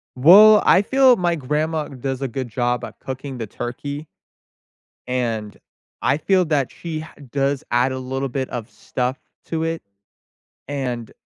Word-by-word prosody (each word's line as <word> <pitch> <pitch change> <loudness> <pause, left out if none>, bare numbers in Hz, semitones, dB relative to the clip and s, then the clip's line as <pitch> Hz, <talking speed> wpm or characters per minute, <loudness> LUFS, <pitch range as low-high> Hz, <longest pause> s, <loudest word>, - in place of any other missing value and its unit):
Well, 205 +11 +8
I 185 - +6
feel 260 +3 +5
my 175 -4 0
grandma 150 +2 -1
does 135 0 -5
a 135 - -1
good 130 0 -5
job 120 +1 -1
at - - -9
cooking 130 0 -6
the 115 -2 -5
turkey 140 +7 -6 1.0
and 115 -4 -2 0.4
I - - +2
feel 185 +3 +2
that 145 -5 0
she 160 -2 -5
ha 160 - -11 0.2
does 140 0 0
add 120 +2 +2
a 130 - -4
little 135 +1 -3
bit 130 +1 -3
of 120 -1 -5
stuff 125 +1 -3 0.3
to 160 -1 -2
it, 165 0 -2 0.9
and 125 -5 -4
135 Hz, 155 wpm, -21 LUFS, 125-160 Hz, 1.0 s, Well